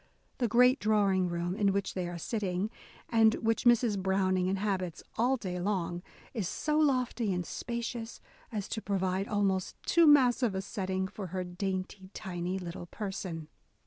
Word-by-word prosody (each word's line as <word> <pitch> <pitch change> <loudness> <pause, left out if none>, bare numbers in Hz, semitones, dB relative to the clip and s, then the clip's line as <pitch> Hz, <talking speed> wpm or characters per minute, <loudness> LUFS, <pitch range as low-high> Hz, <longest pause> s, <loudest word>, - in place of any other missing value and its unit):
The 245 - +2
great 250 +4 +5
drawing 200 -4 +2
room 175 +1 -2
in 200 -1 +3
which 200 -1 -1
they 180 -2 -2
are 175 - -5
sitting, 195 +1 -2 0.4
and 225 -1 +5
which 225 +1 0
Mrs. 235 -4 +4
Browning 185 -1 +1
inhabits 190 -3 -1
all 250 +3 +2
day 180 -5 -4
long, 175 -2 -1 0.3
is 215 -8 -2
so 305 0 0
lofty 255 -7 +1
and 180 -1 -1
spacious 235 +1 -4 0.3
as 210 -4 -3
to 220 - -3
provide 190 -1 -1
almost 195 -3 0
too 340 -1 +5
massive 250 -6 +5
a 190 - -1
setting 190 -2 -2
for 195 0 -7
her 185 +1 -3
dainty, 185 +1 -4
tiny 180 -1 -3
little 175 -1 -6
person. 190 -6 -5
195 Hz, 155 wpm, -31 LUFS, 185-225 Hz, 0.4 s, great